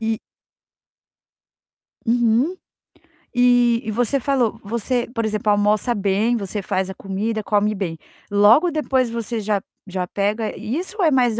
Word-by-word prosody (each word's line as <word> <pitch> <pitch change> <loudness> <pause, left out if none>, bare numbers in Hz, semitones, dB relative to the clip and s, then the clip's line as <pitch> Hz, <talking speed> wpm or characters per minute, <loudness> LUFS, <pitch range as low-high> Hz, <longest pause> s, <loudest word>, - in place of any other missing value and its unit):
E 225 0 -1 1.9
Uhum. 240 +7 +2 0.8
E 245 -1 +4
e 220 - -3
você 245 +5 +1
falou 245 -4 0
você, 235 +3 -1
por 230 -2 -1
exemplo, 215 -1 0
almoça 210 +3 +2
bem, 205 +4 +1
você 200 0 -4
faz 190 -1 -1
a 190 - -5
comida, 210 +3 -3
come 210 +1 +1
bem, 185 -5 -4 0.3
logo 210 - +5
depois 265 -5 +1
você 230 0 -3
já 205 -1 0 0.3
já 185 -1 -3
pega 210 +3 -1
isso 335 - -4
ou - - +2
é 315 - +4
mais 245 -4 +2
220 Hz, 140 wpm, -21 LUFS, 205-245 Hz, 1.9 s, logo